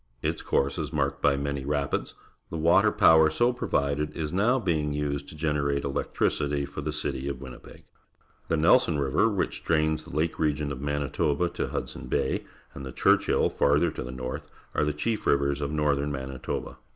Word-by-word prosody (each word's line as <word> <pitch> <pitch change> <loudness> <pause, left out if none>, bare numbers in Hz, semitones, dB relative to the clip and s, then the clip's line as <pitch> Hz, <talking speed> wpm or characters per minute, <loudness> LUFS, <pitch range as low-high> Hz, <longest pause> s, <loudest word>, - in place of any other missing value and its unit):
Its - - -1
course 70 +5 0
is 75 -1 -3
marked 70 -2 -1
bj' 70 -1 +3
many 70 -1 -2
rapids. 70 0 -2 0.3
The 80 - -4
water 80 +2 +4
power 80 -1 +6
so 120 +11 +2
provided 75 -9 -1
is 80 0 -3
now 110 +7 +3
being 80 - 0
used 70 -1 -2
to - - -11
generate 75 -2 0
electricitj' 70 +1 -1
for - - -6
the 75 - -3
citj' 70 -2 -3
of 70 -3 -5
Winnipeg. 65 -2 -11 0.6
The 80 - +1
Nelson 85 +2 +4
River, 70 +8 +2
wliich 100 -4 -2
drains 80 -1 +1
the 80 0 -10
lake 80 +2 0
region 75 -2 0
oT3Ianitoba 70 +4 -1
to - - -2
Hudson 60 - -5
Bay, - - -1 0.3
and 70 - -8
the 65 - -6
Churchill, - - +3
farther 75 +4 +2
to - - -6
the 60 - -5
north, 65 0 -6 0.2
are - - +1
the 75 - +1
chief 110 +10 -2
rivers 70 0 +2
of 70 - -1
northern 75 -1 0
Manitoba. 65 -1 -5
75 Hz, 175 wpm, -27 LUFS, 70-80 Hz, 0.6 s, power